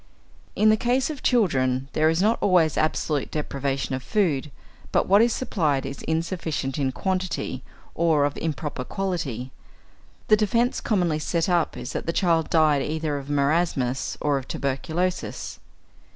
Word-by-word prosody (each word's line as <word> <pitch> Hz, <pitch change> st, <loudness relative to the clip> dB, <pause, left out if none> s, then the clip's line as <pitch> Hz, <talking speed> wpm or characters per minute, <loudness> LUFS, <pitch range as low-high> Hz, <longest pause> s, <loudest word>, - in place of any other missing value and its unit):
In 215 Hz, -, +4 dB
the 215 Hz, -, +5 dB
case 250 Hz, +6 st, +1 dB
of 290 Hz, -, -8 dB
children 135 Hz, -, +2 dB
there 155 Hz, +1 st, +3 dB
is 165 Hz, +3 st, +1 dB
not 220 Hz, +2 st, +2 dB
always 175 Hz, -5 st, +3 dB
absolute 155 Hz, -2 st, 0 dB
deprivation 140 Hz, -3 st, -2 dB
of 130 Hz, -, -2 dB
food, 155 Hz, -, 0 dB, 0.4 s
but -, -, +2 dB
what 200 Hz, +3 st, +6 dB
is 235 Hz, +1 st, +4 dB
supplied 155 Hz, -, 0 dB
is 135 Hz, +1 st, -6 dB
insufficient 160 Hz, -4 st, -2 dB
in 135 Hz, -2 st, +1 dB
quantity 185 Hz, -5 st, -2 dB, 0.3 s
or 160 Hz, -3 st, +3 dB
of 145 Hz, -, -2 dB
improper 150 Hz, -4 st, -3 dB
quality. 145 Hz, -, -3 dB, 0.8 s
The 215 Hz, -, +6 dB
defence 230 Hz, +4 st, +1 dB
commonly 175 Hz, -8 st, +1 dB
set 165 Hz, +1 st, 0 dB
up 175 Hz, -3 st, +1 dB
is -, -, -6 dB
that -, -, -4 dB
the 165 Hz, -, 0 dB
child 165 Hz, -4 st, +2 dB
died 155 Hz, -3 st, +4 dB
either 155 Hz, -1 st, -2 dB
of 140 Hz, +1 st, -10 dB
marasmus 140 Hz, -3 st, 0 dB
or 145 Hz, -2 st, +1 dB
of 130 Hz, -, -11 dB
tuberculosis. 160 Hz, +7 st, -3 dB
160 Hz, 150 wpm, -24 LUFS, 140-185 Hz, 0.8 s, what